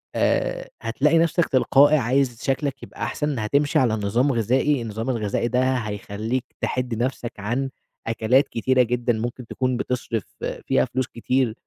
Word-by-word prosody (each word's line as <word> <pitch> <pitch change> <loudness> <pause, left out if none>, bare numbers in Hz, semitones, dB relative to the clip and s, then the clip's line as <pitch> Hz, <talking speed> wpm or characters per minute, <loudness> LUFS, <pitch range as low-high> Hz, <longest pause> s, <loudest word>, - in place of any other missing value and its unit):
آآ - - 0
هتلاقي 150 +4 +2
نفسك 165 +1 +3
تلقائي 140 +3 +5
عايز 125 -1 0
شكلك 140 0 -1
يبقى - - -7
أحسن، 150 -4 -2
هتمشي 140 +7 +2
على 120 -4 +2
نظام 115 +6 +1
غذائي، 125 +4 +1
النظام 115 +2 -4
الغذائي 115 -1 0
ده 130 +1 +2
هيخلّيك 110 +2 -3 0.2
تِحِد 125 -2 -1
نفسك 120 0 -2
عن 120 +7 -1 0.4
أكلات 115 +4 +3
كتيرة 130 +2 +2
جدًا، 120 0 0
ممكن 120 +2 -4
تكون 130 -1 -1
بتصرِف 120 -5 -2 0.4
فيها 65 - +3
فلوس 130 0 -2
كتير، 120 0 0
125 Hz, 145 wpm, -23 LUFS, 115-135 Hz, 0.4 s, تلقائي